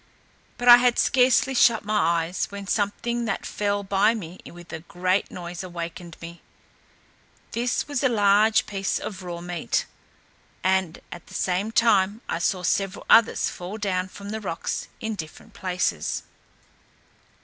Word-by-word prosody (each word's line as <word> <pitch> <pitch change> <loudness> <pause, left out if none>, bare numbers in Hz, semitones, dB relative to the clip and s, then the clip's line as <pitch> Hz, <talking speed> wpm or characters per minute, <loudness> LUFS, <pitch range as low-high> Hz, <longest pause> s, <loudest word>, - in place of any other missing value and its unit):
But 245 - -3
I 240 0 +12
had 245 -1 +2
scarcely 260 +1 +3
shut 235 -4 +4
my 170 -6 +2
eyes, 175 +3 -3
when 200 0 -7
something 235 +4 -1
that 200 - -3
fell 205 -1 -1
by 200 +3 +3
me 180 -4 -8
with 175 0 -12
a 160 - -4
great 185 +3 -1
noise 175 -1 -7
awaked 170 -1 -7
me. 170 0 -9 1.1
This 240 +1 -1
was 285 -3 -2
a 260 - +4
large 215 0 +4
piece 195 -1 -2
of 190 -2 -6
raw 175 -2 -6
meat; 175 -1 -2 0.8
and 185 -2 +1
at 170 - -10
the - - -12
same 190 +4 0
time 215 -2 +3
I 170 - -2
saw 180 +1 0
several 195 +2 -1
others 230 - +5
fall 180 +4 -7
down 185 -3 -1
from 200 +2 -10
the 220 0 -4
rocks 170 -5 -3
in 220 0 -3
different 160 -6 -9
places. 180 - -2
195 Hz, 150 wpm, -25 LUFS, 175-220 Hz, 1.1 s, I